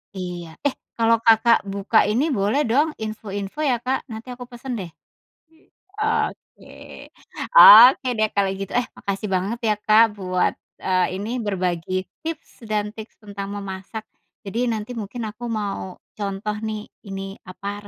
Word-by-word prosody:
Iya. 175 -3 -7
Eh, 275 - -2 0.2
kalau 230 0 +5
Kakak 230 0 +5
buka 200 +2 +2
ini, 240 +9 +1
boleh 225 +8 +1
dong 290 +7 +2
info-info 215 +2 -5
ya, 250 -5 +2
Kak. 260 +3 -2
Nanti 220 +3 -8
aku 250 - -8
pesen 245 +1 -6
deh. 175 -3 -7 1.0
I 425 - -2 0.3
oke. - - -22 0.9
Oke 255 - +10
deh 215 0 +3
kalau 200 -1 +2
gitu. 195 - -5
Eh 245 - +3
makasih 200 +1 -4
banget 195 +6 -1
ya, 215 -1 +2
Kak, 215 +2 +6 0.2
buat, 185 -1 0 0.3
eee, 185 -1 +2
ini 225 +6 -3
berbagi 185 -3 -2 0.2
tips 315 -8 -7
dan 210 -1 -1
tips 220 0 -11
tentang 200 -1 -6
memasak. 200 +2 -6 0.4
Jadi 230 +5 -2
nanti 220 +1 -3
mungkin 225 +3 -6
aku 235 +3 -13
mau 200 -4 -3 0.2
contoh 205 +1 -3
nih, 215 -1 -4 0.2
ini 195 0 -6
apa 200 +2 -7
210 Hz, 150 wpm, -22 LUFS, 195-230 Hz, 1.0 s, Oke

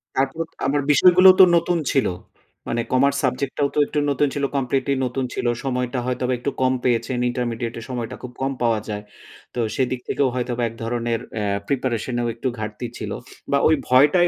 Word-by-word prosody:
তারপর, 135 +5 0 0.2
আমার 145 +1 +1
বিষয়গুলোও 185 +5 +7
তো - - +11
নতুন 170 +1 +2
ছিল। 135 - +2 0.6
মানে, 115 - 0
কমার্স 140 +2 +3
সাবজেক্ট 130 +1 -1
টাও 140 -1 +2
তো - - +2
একটু 150 - -1
নতুন 145 +1 +2
ছিল 140 - -3
কমপ্লিটলি 135 +1 0
নতুন 130 +1 -2
ছিল। - - -3 0.2
সময়টা 125 -1 -1
হয়তোবা 125 0 -1
একটু 140 +3 -2
কম 130 0 +3
পেয়েছেন। 125 +1 0
ইন্টারমিডিয়েট 120 -1 -3
এ - - -8
সময়টা 125 -1 -4
খুব 125 - -7
কম 135 +1 0
পাওয়া 115 -2 +2
যায়। 105 0 -4 0.5
তো - - -2 0.2
সেদিক 130 -1 0
থেকেও 140 - +1
হয়তোবা, 125 -1 -2
এক - - -12
ধরনের 115 0 -1 0.2
অ্যা 100 -2 0
প্রিপারেশন 125 -3 -1
এও 120 - -1
একটু 125 - -3
ঘাটতি 110 +2 -4
ছিল। 105 -2 -5 0.4
বা 140 - +4
ওই 160 - +5
ভয়টাই 145 +8 +5
130 Hz, 185 wpm, -22 LUFS, 120-140 Hz, 0.6 s, তো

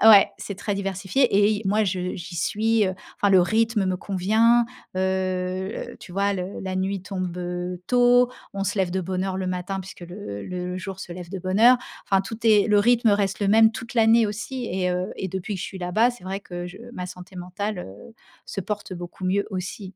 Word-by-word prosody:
Ouais, 215 -2 +9
c'est 200 - -6
très 205 0 -2
diversifié 195 +5 -1
et 205 +1 +5
i 215 0 -1
moi, 210 +2 +2
je 180 -1 -2
j'y 170 0 -8
suis, 220 +5 +2
heu, 185 - -2 0.2
enfin 205 - +2
le 190 -1 +7
rythme 220 +2 +2
me 185 -1 0
convient, 220 +6 +3 0.3
heu, 185 +1 -2
tu - - -11
vois 200 +2 +1
le 185 0 -4
la 190 -1 -4
nuit 190 0 -1
tombe, 185 -2 -4
heu, 180 0 -4
tôt, 245 0 +5 0.2
on 195 0 -2
se 200 - -2
lève 185 -2 +1
de 190 +1 -1
bonne 185 +1 -2
heure 190 -1 -2
le 190 -1 -2
matin 185 +2 -3
puisque 190 0 -11
le 175 - -7
le 180 0 -4
jour 190 0 -6
se 180 - -7
lève 175 -1 -8
de 195 - -4
bonne 185 +3 -1
heure. 245 +2 +8 0.3
Enfin 195 -1 +3
tout 210 +3 -6
est 215 -3 +5
le 210 -1 +5
rythme 235 +1 +4
reste 200 -2 +1
le 205 - 0
même 220 +2 +6
toute 235 +2 -8
l'année 225 0 +5
aussi 230 +5 -4
et 180 -1 0
heu 180 +1 -2
et 190 - -4
depuis 190 +3 -4
que 190 - -5
je - - -3
suis 190 - -8
là-bas, 185 +7 +2
c'est 240 -7 -13
vrai 190 +1 -3
que 175 -2 -6
je 180 +1 -10
ma 180 -4 -5
santé 180 +1 -11
mentale, 180 +3 -4
heu, 105 - -10 0.3
se 195 - -5
porte 205 0 -4
beaucoup 175 +1 -8
mieux 195 +2 +1
aussi. 190 +1 -5
190 Hz, 225 wpm, -24 LUFS, 180-210 Hz, 0.3 s, Ouais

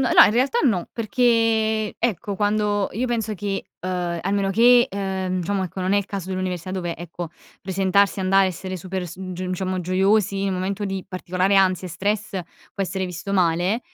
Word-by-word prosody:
no, - - +10
in - - +4
realtà 260 - +2
no, 195 -10 +1
perché, 225 -2 +1
ecco, 205 -3 -1
quando 205 -1 +1
io 245 +6 -1
penso 225 -3 -1
che, 200 0 -3 0.2
uhm, 180 -2 -2
a 195 - -2
meno 200 -1 +1
che, 240 +4 +6
uhm, 190 -2 -2
diciamo, 190 +2 -1
ecco, 185 +1 -6
non 185 +2 +1
è - - +4
il 200 - +1
caso 195 -2 -5
dell'università, 185 -1 -3
dove, 175 -3 -3
ecco, 170 0 -7 0.3
presentarsi, 195 +1 +2
andare, 190 0 +4
essere 185 +1 -5
super 185 +1 -4
su 185 +2 -7
diciamo, 185 +1 -3
gioiosi 195 +2 +2
in 200 - 0
un 190 - -1
momento 195 +3 -2
di 195 -1 -3
particolare 185 +1 0
ansia 185 -1 +3
e - - -10
stress 205 +5 -1 0.4
può 200 - -1
essere 190 0 -2
visto 180 +3 -6
male, 180 +4 +2
190 Hz, 185 wpm, -23 LUFS, 185-205 Hz, 0.4 s, no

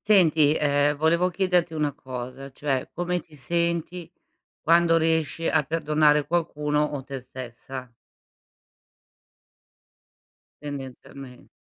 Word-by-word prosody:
Senti, 160 -7 +4
ehm 145 0 +2
volevo 170 +4 +3
chiederti 180 -3 +1
una 150 -2 0
cosa, 130 0 -8
cioè 135 -2 -2
come 175 0 -2
ti 155 - -19
senti 170 +2 -2 0.5
quando 170 0 +4
riesci 160 0 0
a 160 - +3
perdonare 150 -1 +2
qualcuno 150 -3 0
o 145 -3 -3
te 135 -2 -6
stessa? 130 0 -9 2.7
Tendenzialme 135 -2 -9
150 Hz, 100 wpm, -25 LUFS, 135-170 Hz, 2.7 s, Senti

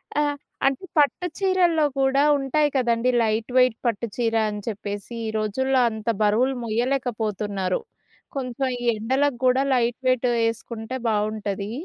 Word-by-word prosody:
ఆ! 295 - +3 0.4
అంటే, 275 +6 +1
పట్టు 300 +5 +3
చీరల్లో 360 -5 +3
కూడా 270 +1 +3 0.2
ఉంటాయి 290 +2 +1
కదండీ 240 -1 +2
లైట్ 220 +1 -1
వెయిట్ 250 -2 +5
పట్టు 235 -1 0
చీర 230 -2 0
అని 210 0 -5
చెప్పేసీ. 205 +1 -5
ఈ - - -1
రోజుల్లో 260 +5 +1
అంత 220 -1 -8
బరువులు 230 +6 +2
మొయ్యలేకపోతున్నారు. 215 -5 -1 0.6
కొంచెం 265 0 -2
ఈ - - -8 0.2
ఎండలకు 265 +4 0
గూడా 255 +1 +4
లైట్ 240 -1 +1
వెయిటు 255 -1 +2 0.2
యేసుకుంటే 225 +1 -4
బావుంటదీ. 210 -1 -2
240 Hz, 130 wpm, -24 LUFS, 215-265 Hz, 0.6 s, వెయిట్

